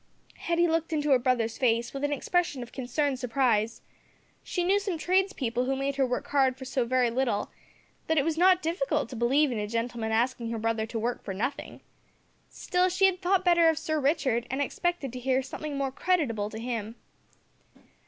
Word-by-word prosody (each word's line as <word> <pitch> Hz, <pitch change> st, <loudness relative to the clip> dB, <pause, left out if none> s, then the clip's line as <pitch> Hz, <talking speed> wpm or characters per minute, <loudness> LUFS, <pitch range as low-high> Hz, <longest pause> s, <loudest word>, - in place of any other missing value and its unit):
Hetty 340 Hz, 0 st, +1 dB
looked 330 Hz, 0 st, 0 dB
into 300 Hz, -2 st, 0 dB
her 260 Hz, -, +6 dB
brother's 240 Hz, -3 st, 0 dB
face 235 Hz, -2 st, +1 dB
with 275 Hz, 0 st, -5 dB
an 290 Hz, -, 0 dB
expression 290 Hz, -2 st, 0 dB
of 240 Hz, -, -12 dB
concerned 265 Hz, +1 st, -1 dB
surprise. 230 Hz, -3 st, 0 dB, 0.6 s
She 355 Hz, -, -2 dB
knew 390 Hz, +3 st, +3 dB
some 395 Hz, -4 st, -3 dB
tradespeople 315 Hz, -, 0 dB
who 270 Hz, +1 st, 0 dB
made 275 Hz, +1 st, -2 dB
her 270 Hz, -2 st, +2 dB
work 250 Hz, -, -2 dB
hard 265 Hz, -2 st, +2 dB
for 260 Hz, -, -8 dB
so 255 Hz, -2 st, -1 dB
very 250 Hz, -1 st, +2 dB
little, 240 Hz, -4 st, -1 dB, 0.6 s
that 320 Hz, -, +1 dB
it 280 Hz, -, +3 dB
was 325 Hz, -1 st, 0 dB
not 365 Hz, +2 st, +4 dB
difficult 345 Hz, +10 st, -1 dB
to 255 Hz, -, -7 dB
believe 265 Hz, +5 st, +2 dB
in 230 Hz, -, -2 dB
a 210 Hz, -, -2 dB
gentleman 230 Hz, 0 st, -2 dB
asking 235 Hz, +1 st, 0 dB
her 230 Hz, -, -3 dB
brother 220 Hz, 0 st, -1 dB
to 230 Hz, -, -5 dB
work 235 Hz, +2 st, -2 dB
for 195 Hz, -, -5 dB
nothin'! 250 Hz, +8 st, -4 dB, 0.7 s
Still 365 Hz, 0 st, 0 dB
she 380 Hz, +2 st, +3 dB
had 375 Hz, -1 st, +2 dB
thought 375 Hz, +1 st, +1 dB
better 340 Hz, -2 st, +5 dB
of 320 Hz, -, +1 dB
Sir 315 Hz, -1 st, -1 dB
Richard, 265 Hz, -5 st, +1 dB
and 265 Hz, -, -2 dB
expected 285 Hz, -2 st, -2 dB
to 250 Hz, -, -5 dB
hear 260 Hz, +1 st, +1 dB
something 295 Hz, +1 st, -6 dB
more 275 Hz, -1 st, -1 dB
creditable 260 Hz, -, 0 dB
to 220 Hz, -, -8 dB
him. 225 Hz, -1 st, -4 dB
265 Hz, 195 wpm, -28 LUFS, 235-325 Hz, 0.7 s, her